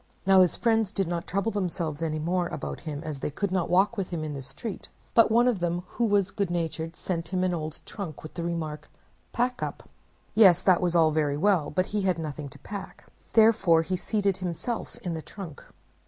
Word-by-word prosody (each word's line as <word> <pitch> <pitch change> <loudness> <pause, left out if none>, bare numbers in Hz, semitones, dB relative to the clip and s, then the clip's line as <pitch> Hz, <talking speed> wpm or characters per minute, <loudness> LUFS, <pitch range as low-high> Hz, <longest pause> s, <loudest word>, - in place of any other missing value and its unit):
Now 190 -1 +7
his 180 - +3
friends 225 -4 +2
did 195 -4 -1
not 170 0 -3
trouble 200 +4 0
themselves 170 -6 -2
any 155 -1 -1
more 175 +3 0
about - - -5
him 145 +1 -5
as 155 -3 -5
they - - -2
could 195 +6 -2
not 185 -3 0
walk 195 +6 +3
with 195 -3 -1
him 170 -3 -3
in 155 -1 -4
the 140 - -5
street, 140 - -6 0.2
but 230 -1 +6
one 235 +3 +4
of 235 -6 +2
them, 175 0 -1
who 235 - 0
was 200 -3 +2
good 200 -4 -1
natured, 165 -1 -3
sent 170 -2 -3
him 185 -1 -1
an 185 -1 +1
old 155 -2 -4
trunk, 180 -8 -7
with 155 - -9
the 170 - -4
remark: 160 -3 -4 0.4
"Pack 250 +1 0
up!" - - -5 0.5
Yes, 195 -6 +7
that 185 -3 +4
was 175 -1 +1
all 160 -2 +5
very 150 -2 +1
well, 180 -2 +2
but 185 - +1
he 210 - +1
had 185 -3 +1
nothing 150 -3 -5
to - - -12
pack, 200 -1 -8 0.3
therefore 215 -7 +5
he 185 +3 -1
seated 200 0 0
himself 185 +6 -4
in 175 -3 -2
the 160 - -4
trunk. 175 -4 -9
180 Hz, 215 wpm, -27 LUFS, 160-200 Hz, 0.5 s, Now